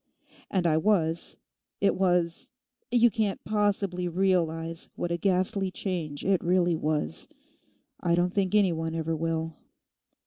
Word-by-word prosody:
And 185 -3 0
I 155 -2 +3
was—it 170 +1 0
was—you 235 +7 0
can't 210 -3 -1
possibly 200 -4 0
realise 165 -2 0
what 175 - -3
a 170 - 0
ghastly 190 +1 +1
change 170 -7 -4
it 190 -1 +2
really 175 0 +3
was. 150 - -1 0.7
I 170 -1 +2
don't 175 +1 +1
think 195 0 +1
any 200 -4 +5
one 160 0 -3
ever 165 0 -1
will. 160 0 -2
180 Hz, 125 wpm, -28 LUFS, 165-195 Hz, 0.7 s, any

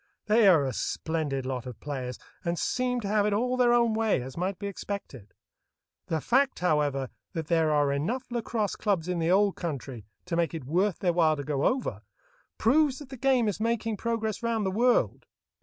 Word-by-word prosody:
They 220 0 +5
are 165 -7 +6
a 130 - -2
splendid 145 -1 -2
lot 130 -1 -4
of 125 - -8
players, 130 -4 -5 0.3
and 170 0 -1
seem 250 +6 0
to 205 - -4
have 210 0 +2
it 210 - +1
all 250 +4 +1
their 250 -1 +4
own 235 -2 +3
way, 220 -5 +2
as 130 +1 -8
might 185 +2 -2
be 200 - -6
expected. 195 - -6 0.7
The 160 - 0
fact, 265 - +2
however, 145 -6 +1 0.2
that 160 -4 -4
there 160 -2 +3
are 145 -1 +3
enough 200 - -1
lacrosse 230 -3 -1
clubs 190 -6 0
in 180 -1 -1
the 165 0 +1
Old 200 +1 +3
Country 135 - -5 0.2
to 180 -2 -2
make 170 0 0
it 155 -6 -6
worth 180 +7 +1
their 175 -2 +1
while 160 -2 +3
to 145 - -5
go 140 0 -1
over, 245 - -1 0.6
proves 275 +3 +3
that 290 -3 -10
the 270 - -7
game 255 -2 +2
is 205 -1 -2
making 225 0 0
progress 225 -1 -2
round 230 -3 0
the 190 - 0
world. 240 +5 +2
190 Hz, 200 wpm, -28 LUFS, 150-230 Hz, 0.7 s, are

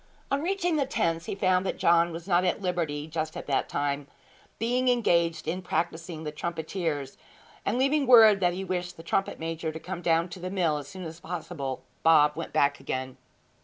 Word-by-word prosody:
On 275 +1 +1
reaching 355 -1 0
the 275 -3 +1
tents 165 -9 -1
he - - -3
found 185 -1 +2
that 190 - -2
John 170 0 +4
was 165 +2 -7
not 180 -1 +3
at 180 - +1
liberty 170 -6 -2
just 155 0 -4
at - - -6
that 140 - 0
time, 145 0 -2 0.5
being 245 +3 0
engaged 170 -9 +2
in 180 +3 -2
practising 165 -1 -3
the 150 - -4
trumpeters; 160 -2 -3 0.5
and 215 - +1
leaving 275 +1 +2
word 220 -5 +8
that 175 -2 +2
he 190 - -4
wished 180 -1 -3
the 165 - -10
trumpet 195 +3 -1
major 165 0 -3
to 160 - -7
come 180 +1 -6
down 165 0 +2
to 185 - -8
the 180 +1 -4
mill 170 -6 +1
as 140 - -9
soon 185 +6 -8
as 165 0 -8
possible, 160 -6 -5 0.2
Bob 150 -2 +5
went 165 - -5
back 140 0 +2
again. 130 -1 -4
170 Hz, 200 wpm, -27 LUFS, 160-190 Hz, 0.5 s, word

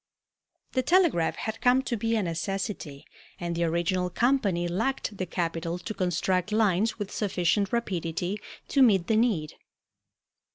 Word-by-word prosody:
The 260 - +1
telegraph 330 - +3
had 220 0 -5
come 255 +1 +4
to 240 - -2
be 230 +1 0
a 215 - +1
necessity 170 -3 -4 0.3
and 170 -1 -3
the 170 0 +1
original 175 +2 0
company 200 -5 +1
lacked 220 +5 -1
the 185 -2 -3
capital 165 0 -2
to 180 +5 -6
construct 185 0 0
lines 215 0 +2
with 205 -3 -5
sufficient 195 0 0
rapidity 180 -3 -2 0.3
to 275 - +3
meet 200 -9 +5
the 220 - +1
need. 215 -10 +1
190 Hz, 140 wpm, -27 LUFS, 170-225 Hz, 0.3 s, meet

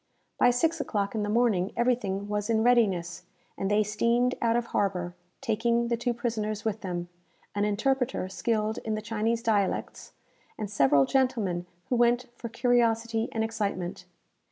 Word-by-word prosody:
By 245 - +6
six 315 +6 +1
o'clock 200 -6 -2
in 220 - -1
the 205 - -2
morning 215 -4 +2
everything 220 -5 0
was 210 +1 -2
in 220 -1 +2
readiness, 195 -9 +2 0.3
and 195 - -2
they 210 +1 +3
steamed 235 +4 +1
out 230 -1 +2
of 240 0 +1
harbour, 180 -3 0 0.3
taking 235 -1 +1
the 235 - +2
two 240 +1 -1
prisoners 220 -3 -3
with 220 -1 -1
them, 175 -2 -4 0.5
an 205 0 0
interpreter 250 +1 0
skilled 215 +2 -1
in 220 -1 -3
the 215 - -3
Chinese 225 +1 -1
dialects, 205 -4 -1 0.4
and 210 -2 -4
several 140 -6 +4
gentlemen 220 - 0 0.2
who 250 - +2
went 240 +1 +3
for 235 - -7
curiosity 230 -1 +1
and 220 - -1
excitement. 205 -5 -3
225 Hz, 155 wpm, -28 LUFS, 205-235 Hz, 0.5 s, By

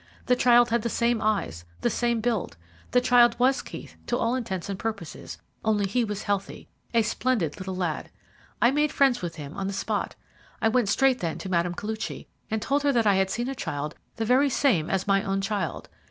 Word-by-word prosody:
The 250 - +4
child 240 -1 +5
had 235 0 +2
the 235 - -2
same 235 0 +1
eyes, 200 - -1 0.2
the - - +2
same 235 -2 0
build. 215 - -1 0.3
The 250 - +3
child 240 -1 +5
was 260 +2 +3
Keith - - -10
to 240 - +1
all 230 0 +1
intents 200 -9 -3
and 200 -1 -4
purposes, 215 -8 -5 0.3
only 210 -2 +2
he 240 +5 +1
was 210 -2 -4
healthy 200 -1 -3 0.2
a 230 -1 +3
splendid 215 - -1
little 190 0 -4
lad. 175 -4 -2 0.5
I 240 - +6
made 295 +1 +2
friends 270 -5 +3
with 175 -2 -4
him 145 -2 -8
on 195 -1 -3
the 200 - -3
spot. 195 - -2 0.4
I 225 - +3
went 225 -3 +2
straight 265 +4 +3
then 165 -2 -2
to 190 - -6
Mme. 175 -1 +1
Koluchy, 220 +3 -5 0.2
and 220 -1 -2
told 280 +1 +1
her 285 0 +3
that 235 -4 +2
I 205 - +5
had 190 0 +2
seen 240 +5 -2
a 270 - -2
child 150 - -4 0.2
the 225 - -2
very 260 +5 +4
same 230 - +2
as 190 -1 0
my 195 -1 +3
own 195 0 -1
child. 195 -6 -3
220 Hz, 210 wpm, -26 LUFS, 190-245 Hz, 0.5 s, I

